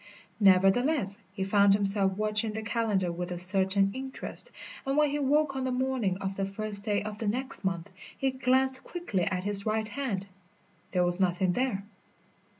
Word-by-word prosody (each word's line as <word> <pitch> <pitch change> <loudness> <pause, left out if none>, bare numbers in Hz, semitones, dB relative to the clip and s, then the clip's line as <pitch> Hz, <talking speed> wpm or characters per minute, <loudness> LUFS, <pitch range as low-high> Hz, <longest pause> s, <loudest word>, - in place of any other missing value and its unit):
Nevertheless, 200 +4 +3
he 190 0 -4
found 200 0 +4
himself 195 -1 +7
watching 215 +1 0
the 220 0 -5
calendar 210 -5 -1
with 175 +1 -5
a 175 - -4
certain 190 +2 +3
interest, 265 - -5 0.3
and 270 +1 -2
when 300 -1 +3
he 295 - -2
woke 285 0 +1
on 265 - -3
the 260 - -2
morning 250 -7 -1
of 195 0 -5
the 195 - -2
first 200 0 -1
day 205 -2 0
of 210 0 -7
the 220 - -3
next 255 +4 -1
month 185 -3 -3 0.3
he 270 -1 0
glanced 260 0 0
quickly 280 - -3
at 185 -3 -2
his 200 0 +3
right 215 0 -1
hand. 225 -7 -4 0.7
There 180 -1 +1
was 175 +1 0
nothing 185 0 +1
there. 240 -2 -2
205 Hz, 175 wpm, -28 LUFS, 190-260 Hz, 0.7 s, himself